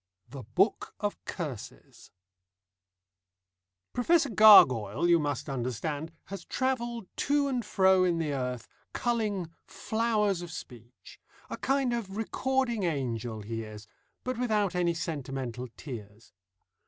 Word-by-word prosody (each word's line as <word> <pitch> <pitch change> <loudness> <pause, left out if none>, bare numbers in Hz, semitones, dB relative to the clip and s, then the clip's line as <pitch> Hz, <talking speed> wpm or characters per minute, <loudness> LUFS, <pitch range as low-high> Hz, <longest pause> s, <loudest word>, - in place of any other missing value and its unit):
THE 135 +1 -8
BOOK 150 - 0
OF 205 -1 -3
CURSES 145 - -7 1.8
Professor 290 +2 +3
Gargoyle, 140 - +7
you 170 -1 +5
must 145 -1 -2
understand, 140 +4 -3
has 195 -3 -7
travelled 240 -3 -2
to 285 0 +2
and 255 -3 -1
fro 190 -2 +4
in 175 -2 +2
the 155 -3 -1
earth, 125 -3 -3 0.3
culling 210 -8 -1 0.2
flowers 215 -4 0
of 175 - -7
speech: 120 -4 -11 0.3
a - - -3
kind 270 -2 +1
of 210 -4 -4
recording 255 0 0
angel 120 - -2
he 115 +2 -4
is, 110 -1 -9 0.4
but 255 -2 -3
without 215 -6 +1
any 175 -1 +1
sentimental 135 -6 -4
tears. 110 -5 -9
175 Hz, 115 wpm, -29 LUFS, -, 1.8 s, Gargoyle